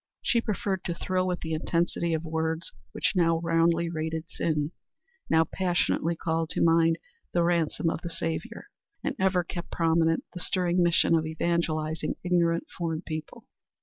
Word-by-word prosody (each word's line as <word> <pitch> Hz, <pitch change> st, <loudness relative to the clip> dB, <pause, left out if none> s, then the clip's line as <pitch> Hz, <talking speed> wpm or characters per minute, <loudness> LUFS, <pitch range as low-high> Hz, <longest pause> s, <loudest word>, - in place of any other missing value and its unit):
She 235 Hz, -, +3 dB
preferred 200 Hz, -4 st, -2 dB
to 170 Hz, -, -2 dB
thrill 185 Hz, +1 st, 0 dB
with 180 Hz, -1 st, -2 dB
the 160 Hz, 0 st, -3 dB
intensity 170 Hz, +1 st, 0 dB
of 160 Hz, -, -3 dB
words 160 Hz, +1 st, -2 dB, 0.2 s
which -, -, +1 dB
now 165 Hz, -2 st, +3 dB
roundly 165 Hz, 0 st, +3 dB
rated 160 Hz, 0 st, -3 dB
sin, 155 Hz, -3 st, -1 dB, 0.6 s
now 160 Hz, 0 st, +5 dB
passionately 175 Hz, -1 st, 0 dB
called 160 Hz, 0 st, -1 dB
to -, -, +2 dB
mind 165 Hz, 0 st, +4 dB, 0.4 s
the 175 Hz, -, +3 dB
ransom 170 Hz, -1 st, +1 dB
of 165 Hz, -, 0 dB
the 170 Hz, -, -4 dB
Saviour, 165 Hz, -1 st, -4 dB, 0.4 s
and -, -, -1 dB
ever 190 Hz, -1 st, +3 dB
kept 175 Hz, 0 st, -6 dB
prominent 165 Hz, -1 st, +2 dB
the 180 Hz, -, -6 dB
stirring 180 Hz, 0 st, +1 dB
mission 170 Hz, -1 st, +4 dB
of 160 Hz, -1 st, +2 dB
evangelizing 160 Hz, -1 st, -1 dB
ignorant 170 Hz, -2 st, +2 dB
foreign 165 Hz, -1 st, -2 dB
people. 155 Hz, -1 st, -6 dB
165 Hz, 155 wpm, -28 LUFS, 160-175 Hz, 0.6 s, now